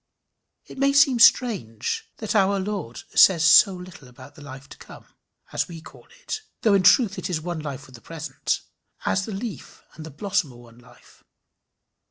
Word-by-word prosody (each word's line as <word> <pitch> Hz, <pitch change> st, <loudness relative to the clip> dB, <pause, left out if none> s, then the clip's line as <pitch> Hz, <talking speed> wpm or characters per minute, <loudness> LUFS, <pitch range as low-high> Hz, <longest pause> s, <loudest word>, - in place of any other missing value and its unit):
It -, -, -12 dB
may 275 Hz, 0 st, +2 dB
seem 280 Hz, -3 st, +4 dB
strange 195 Hz, -, +2 dB
that 220 Hz, -, -4 dB
our 200 Hz, -1 st, +2 dB
Lord 190 Hz, -, -5 dB
says 170 Hz, -4 st, +5 dB
so 185 Hz, +3 st, +6 dB
little 180 Hz, -6 st, -12 dB
about 130 Hz, +3 st, -15 dB
the 150 Hz, -, -16 dB
life 135 Hz, -1 st, -11 dB
to -, -, -13 dB
come -, -, -14 dB, 0.5 s
as -, -, -1 dB
we 170 Hz, -2 st, -10 dB
call -, -, -16 dB, 0.2 s
it 440 Hz, -3 st, -5 dB, 0.2 s
though 215 Hz, -, +3 dB
in 195 Hz, -, +4 dB
truth 195 Hz, +2 st, +4 dB
it -, -, -5 dB
is 170 Hz, -4 st, -2 dB
one 170 Hz, +1 st, -5 dB
life 140 Hz, -4 st, -7 dB
with 130 Hz, -, -18 dB
the 120 Hz, -, -14 dB
present 150 Hz, -4 st, -4 dB, 0.4 s
as 190 Hz, 0 st, 0 dB
the -, -, -6 dB
leaf 210 Hz, +1 st, -8 dB
and 160 Hz, -, -11 dB
the 160 Hz, -, -9 dB
blossom 180 Hz, -2 st, -2 dB
are -, -, -16 dB
one 120 Hz, -1 st, -17 dB
life. 120 Hz, 0 st, -21 dB
175 Hz, 190 wpm, -23 LUFS, 140-200 Hz, 0.5 s, so